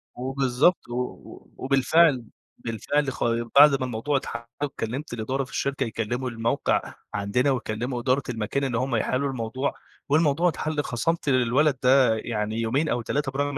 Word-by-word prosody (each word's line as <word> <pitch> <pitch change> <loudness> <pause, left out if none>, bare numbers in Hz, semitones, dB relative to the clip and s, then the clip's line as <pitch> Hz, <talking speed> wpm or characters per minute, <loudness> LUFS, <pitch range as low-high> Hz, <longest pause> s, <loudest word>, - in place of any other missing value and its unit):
وبالضبط، 135 +4 +1
و - - -5
و 125 0 -6
وبالفعل 140 0 +3 0.3
بالفعل 135 +5 -1
خا 115 -1 -1
بعد 140 -1 +8
ما 130 - -1
الموضوع 125 +4 -1
اتحَل 115 -2 -5 0.2
وكلّمت 130 0 -4
الإدارة 130 +4 -2
في 130 - -12
الشركة 140 -1 -1
يكلّموا 120 +2 -3
الموقع 115 +4 -1 0.2
عندنا، 115 +7 +1
ويكلّموا 120 0 -2
إدارة 130 +3 +1
المكان 115 +4 -2
اللي 120 -4 -1
هم 130 -1 -1
يحِلّوا 130 +5 0
الموضوع، 130 +2 -2 0.4
والموضوع 160 +3 +3
اتحَل 155 -2 -2
خَصَمْت 150 +5 -1
للولد 130 +3 +3
ده 125 -3 +5
يعني 110 0 -3
يومين 135 +8 0
أو 120 - 0
3 140 +3 -2
برغم 145 +1 -2
130 Hz, 150 wpm, -25 LUFS, 115-140 Hz, 0.4 s, بعد